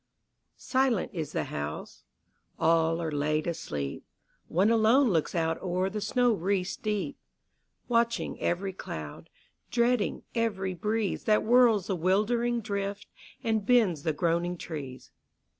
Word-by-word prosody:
Silent 260 -5 +1
is 160 -4 -4
the - - -1
house: 75 +1 -6 0.5
all 165 0 +3
are 165 -2 -2
laid 150 +1 0
asleep: 70 - -4 0.4
One 190 +7 +2
alone 230 +4 +4
looks 160 -1 0
out 165 -1 0
o'er 185 +1 -1
the 210 +1 -3
snow 245 +1 +2
wreaths 185 -1 -1
deep, 210 +6 -3 0.7
Watching 235 -1 0
every 190 +2 -1
cloud, 75 - -7 0.4
dreading 240 -2 +1
every 205 -5 -1
breeze 210 +3 -2
That 215 -1 +3
whirls 235 -4 +5
the 195 - -1
wildering 225 +7 +1
drift, 200 -1 -4 0.3
and 220 -2 +1
bends 205 - +3
the 160 - 0
groaning 170 +2 0
trees. 140 -7 -7
195 Hz, 125 wpm, -28 LUFS, 165-225 Hz, 0.7 s, whirls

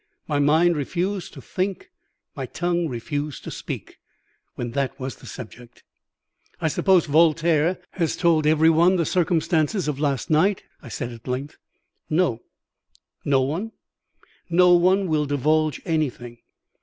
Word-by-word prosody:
My 145 -2 0
mind 160 +4 +4
refused 180 +6 -2
to 135 - -11
think, 190 +1 -3 0.4
my 135 -3 -5
tongue 175 +3 -1
refused 145 +3 -4
to - - -7
speak, - - -7 0.6
when 120 -1 -4
that 135 0 -2
was 130 0 -5
the - - -14
subject. 120 0 -11 0.8
"I 160 - 0
suppose 185 +2 +3
Voltaire 160 +2 +3
has 165 -4 -1
told 165 -4 +3
every 160 +1 +5
one 170 +4 +4
the 170 -3 +1
circumstances 170 +1 +1
of 145 -2 -2
last 145 0 -1
night?" 185 +6 +2 0.2
I - - -12
said 125 -3 -4
at 115 +1 -12
length. 130 +3 -4 0.5
"No." 155 -8 +1 0.8
"No 135 -2 +3
one?" 170 +12 -3 0.8
"No 180 +1 +5
one 185 +3 +4
that 185 -4 -3
will 150 -2 +1
divulge 155 +2 +1
anything. 125 -7 -2
155 Hz, 145 wpm, -23 LUFS, 140-175 Hz, 0.8 s, every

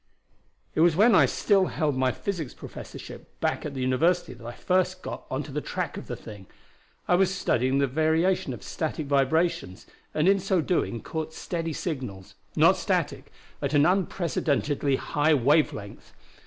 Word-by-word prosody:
"It - - -2
was 170 -1 +5
when 220 +6 +5
I - - +6
still 195 -3 +2
held 150 -4 -1
my 130 0 +2
physics 165 -3 -4
professorship - - -10
back - - -1
at 140 - -8
the 130 - -3
university 165 +8 +1
that 120 - -15
I 115 - -6
got - - -16
first 185 0 0
onto 140 +2 -5
the 150 +2 -2
track - - -3
of - - -8
the - - -4
thing. 100 -4 -11 0.6
I - - +3
was 185 +1 +4
studying 130 -8 +1
the 140 - +3
variation 160 +4 +1
of 120 - -8
static 155 -1 -3
vibrations, 140 - 0 0.3
and 155 +3 +2
in 195 0 +5
so 190 -1 +1
doing 160 - -1
caught 160 0 -5
steady 165 -2 -3
signals 125 - -5 0.2
not - - +5
static - - -2 0.3
at 140 +1 -1
an 145 +1 +5
unprecedentedly 155 -6 +1
high 150 +3 +2
wave 145 +4 +3
length. 100 -1 -10
155 Hz, 170 wpm, -26 LUFS, 130-175 Hz, 0.6 s, I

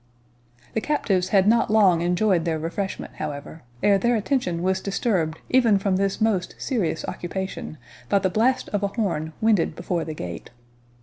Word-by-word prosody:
The 220 - 0
captives 200 -11 0
had 195 -1 +4
not 230 +2 +4
long 195 -6 +4
enjoyed 180 0 +2
their 165 -1 0
refreshment, 175 +5 -4
however, 150 +1 -6 0.2
ere 200 -1 +5
their 240 +3 +2
attention 210 -7 -1
was 190 +1 +1
disturbed 190 -6 0
even 235 -5 +5
from 195 -1 0
this 195 +1 0
most 215 -5 0
serious 195 - -1
occupation 190 -3 -5 0.3
by - - +4
the 190 -1 +1
blast 240 +6 +2
of 205 - -1
a 200 - +1
horn 175 -8 -2
winded 215 -8 +2
before 175 0 -2
the 155 - -6
gate. 90 - -7
190 Hz, 165 wpm, -24 LUFS, 170-215 Hz, 0.3 s, ere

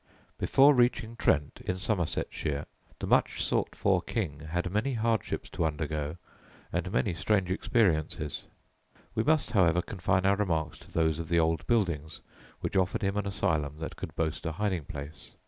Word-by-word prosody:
Before 140 +2 +6
reaching 120 -2 +2
Trent, 75 -9 +1
in 90 - -2
Somersetshire, 85 -6 -1 0.3
the - - -4
much - - +2
sought - - 0
for 95 -3 +2
king 85 -9 -3
had 85 +3 -3
many 110 +7 0
hardships 115 0 0
to 85 - -1
undergo 75 0 -2 0.6
and - - -1
many 65 +7 +1
strange 95 +2 +1
experiences. 80 - 0 0.7
We - - +1
must, 155 -1 +2
however, 90 -5 +4
confine 95 -1 0
our 100 0 +4
remarks 80 -6 -1
to - - -16
those 80 -1 +1
of 80 - -5
the 85 - +3
old 80 0 +1
buildings 85 -10 0 0.4
which - - -3
offered 95 +1 +1
him 100 0 +1
an 105 -1 -1
asylum 80 -7 0
that 80 0 -6
could - - -7
boast 80 -1 -1
a 80 - -2
hiding 95 -4 -1
place. 70 +1 -8
90 Hz, 165 wpm, -29 LUFS, 80-105 Hz, 0.7 s, Before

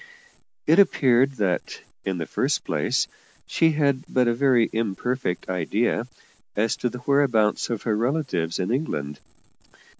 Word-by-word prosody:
It 165 +5 +5
appeared 135 -8 +4
that, 100 -7 -2 0.2
in 95 -2 -1
the 80 - -3
first - - -1
place, - - 0 0.4
she 160 -1 +2
had 140 -3 +1
but 125 -1 +2
a 120 - +3
very 125 -2 +3
imperfect 115 -1 -2
idea 105 +6 0 0.5
as 110 +2 +1
to 125 - -1
the 125 - -7
whereabouts 125 -6 +2
of 115 -3 -3
her 110 -3 0
relatives 115 - -1
in 95 +3 -2
England. 75 - -2
120 Hz, 140 wpm, -24 LUFS, 100-135 Hz, 0.5 s, It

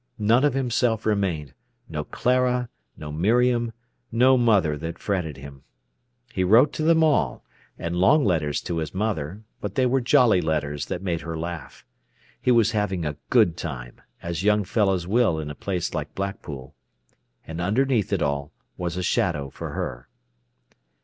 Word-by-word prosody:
None 115 +5 +3
of 145 -3 +2
himself 120 -3 0
remained—no 90 - -3
Clara, 125 -1 +1 0.3
no 75 -1 -7
Miriam, 120 +8 +2 0.4
no 125 +3 +5
mother 105 -11 +3
that 80 +3 -6
fretted 90 -9 -2
him. 70 0 -11 0.7
He 95 - 0
wrote 115 +10 +5
to - - -4
them 160 +1 +4
all, 140 - +1 0.3
and 85 +1 -3
long 125 - +4
letters 75 -6 0
to 85 - -3
his 80 +2 -5
mother; 100 -2 -2 0.2
but 100 -1 -5
they 130 - +3
were 130 +1 +2
jolly 120 -5 +4
letters 75 -3 -2
that 90 - -4
made 85 -3 -1
her 80 -1 -5
laugh. 85 -2 -7 0.6
He - - 0
was 115 -2 +4
having 105 -6 -1
a 75 -1 -3
good 85 - +4
time, 65 -8 -7 0.2
as 85 0 -3
young 105 0 +3
fellows 95 -3 +1
will 100 -4 +2
in 75 -1 -5
a - - -5
place 90 -1 -3
like 75 -3 -4
Blackpool. 75 -9 -5 0.7
And 80 +2 -5
underneath 115 +3 +1
it - - +1
all 70 0 -2 0.3
was 85 0 -3
a 90 - -2
shadow 75 -7 0
for - - -7
her. - - -5
95 Hz, 160 wpm, -24 LUFS, 80-115 Hz, 0.7 s, no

